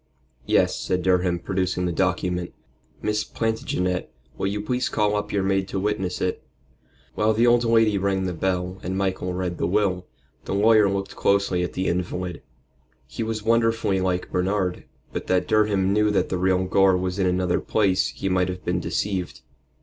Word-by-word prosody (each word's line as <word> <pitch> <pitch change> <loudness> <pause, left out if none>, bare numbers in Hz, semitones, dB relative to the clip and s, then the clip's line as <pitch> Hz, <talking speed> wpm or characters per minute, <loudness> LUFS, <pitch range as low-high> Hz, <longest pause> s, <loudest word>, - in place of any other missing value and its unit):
"Yes," - - +3
said 90 -1 -1
Durham, 90 -1 +2
producing 90 0 -1
the 90 - 0
document. 90 +1 -1 0.5
"Miss 105 0 0
Plantagenet, 90 -5 -2 0.2
will - - -2
you 100 +1 -2
please 125 +5 -1
call 105 0 +1
up 105 - -2
your 100 -2 0
maid 95 0 +1
to 95 - -3
witness 95 -2 -2
it?" 90 - -2 0.7
While 110 +1 +2
the 115 +2 +3
old 120 0 +4
lady 115 -3 +3
rang 95 0 0
the 90 - -2
bell 90 +1 -2
and 95 +1 -3
Michael 95 -2 -1
read 90 -2 -3
the - - +1
will, 90 -1 0 0.4
the - - -2
lawyer 105 0 +5
looked 100 0 -3
closely 100 -2 +1
at 90 - -3
the 95 - -2
invalid. 90 0 -2 0.6
He 65 - -7
was 110 -1 -3
wonderfully 115 -3 +2
like 90 -1 -1
Bernard, 90 0 0
and - - -18 0.3
but - - -4
that 95 -1 +1
Durham 100 -3 +2
knew 105 0 +3
that 105 - +1
the 95 - -1
real 95 0 +2
Gore 95 0 +4
was 90 +1 -3
in 95 - +2
another 90 -1 +1
place 100 -3 +1
he - - -5
might 90 -1 +1
have 90 0 -6
been 90 +1 0
deceived. 95 0 -3
95 Hz, 180 wpm, -24 LUFS, 90-105 Hz, 0.7 s, lawyer